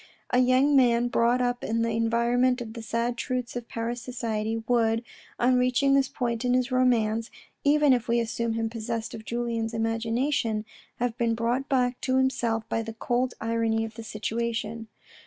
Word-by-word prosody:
A 250 Hz, -, +4 dB
young 255 Hz, +3 st, +4 dB
man 240 Hz, -2 st, +4 dB
brought 240 Hz, +2 st, +2 dB
up 245 Hz, 0 st, -1 dB
in 230 Hz, +1 st, 0 dB
the 230 Hz, -, 0 dB
environment 235 Hz, +3 st, +2 dB
of 225 Hz, -2 st, -6 dB
the 230 Hz, -, -7 dB
sad 230 Hz, +2 st, -2 dB
truths 250 Hz, -2 st, -3 dB
of 240 Hz, -1 st, -5 dB
Paris 235 Hz, +1 st, -4 dB
society, 225 Hz, -2 st, -3 dB
would, 230 Hz, -1 st, +2 dB, 0.4 s
on 250 Hz, +1 st, +4 dB
reaching 255 Hz, +2 st, +3 dB
this 275 Hz, -1 st, +4 dB
point 235 Hz, -3 st, -2 dB
in 250 Hz, 0 st, +2 dB
his 255 Hz, +1 st, 0 dB
romance, 230 Hz, -3 st, +2 dB, 0.3 s
even 295 Hz, -1 st, +5 dB
if 245 Hz, -2 st, 0 dB
we 235 Hz, 0 st, +2 dB
assume 230 Hz, 0 st, -1 dB
him 225 Hz, 0 st, -1 dB
possessed 230 Hz, 0 st, -4 dB
of 220 Hz, -, -8 dB
Julien's 230 Hz, -1 st, -2 dB
imagina 225 Hz, +5 st, 0 dB
tion, 220 Hz, -5 st, 0 dB, 0.3 s
have 240 Hz, -1 st, -2 dB
been 230 Hz, -1 st, +1 dB
brought 240 Hz, +4 st, -1 dB
back 250 Hz, -2 st, +1 dB
to 260 Hz, 0 st, +1 dB
himself 235 Hz, -4 st, 0 dB
by 225 Hz, -, -1 dB
the 225 Hz, 0 st, -6 dB
cold 245 Hz, +3 st, -1 dB
irony 225 Hz, -1 st, 0 dB
of 225 Hz, -, -8 dB
the 230 Hz, 0 st, -8 dB
situation. 225 Hz, 0 st, -3 dB
235 Hz, 180 wpm, -27 LUFS, 225-250 Hz, 0.4 s, even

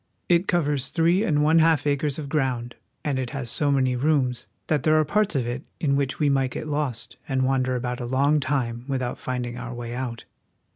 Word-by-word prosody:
It 175 Hz, +2 st, +3 dB
covers 150 Hz, -6 st, 0 dB
three 170 Hz, +4 st, +2 dB
and 150 Hz, -8 st, +2 dB
one 160 Hz, +2 st, +5 dB
half 160 Hz, -3 st, +3 dB
acres 145 Hz, 0 st, 0 dB
of 150 Hz, -3 st, -5 dB
ground, 130 Hz, -5 st, -1 dB, 0.3 s
and 140 Hz, -3 st, 0 dB
it 130 Hz, -2 st, -2 dB
has 125 Hz, -4 st, -3 dB
so 145 Hz, -, +1 dB
many 130 Hz, -2 st, +2 dB
rooms 130 Hz, -3 st, +1 dB, 0.2 s
that 150 Hz, -3 st, +1 dB
there 155 Hz, +2 st, +3 dB
are 155 Hz, 0 st, +4 dB
parts 210 Hz, +3 st, +1 dB
of 130 Hz, -4 st, +1 dB
it 120 Hz, +2 st, -3 dB, 0.2 s
in 140 Hz, -3 st, +1 dB
which 140 Hz, -1 st, -1 dB
we 150 Hz, -, +2 dB
might 135 Hz, -2 st, +2 dB
get 125 Hz, -, -5 dB
lost 145 Hz, -6 st, -3 dB
and 130 Hz, -1 st, +1 dB
wander 130 Hz, -1 st, +1 dB
about 125 Hz, 0 st, -3 dB
a 120 Hz, -, -4 dB
long 140 Hz, +4 st, +3 dB
time 125 Hz, -4 st, -1 dB
without 130 Hz, -3 st, -2 dB
finding 125 Hz, -1 st, -4 dB
our 120 Hz, 0 st, -6 dB
way 120 Hz, 0 st, -6 dB
out. 120 Hz, -2 st, -5 dB
135 Hz, 210 wpm, -25 LUFS, 125-150 Hz, 0.3 s, one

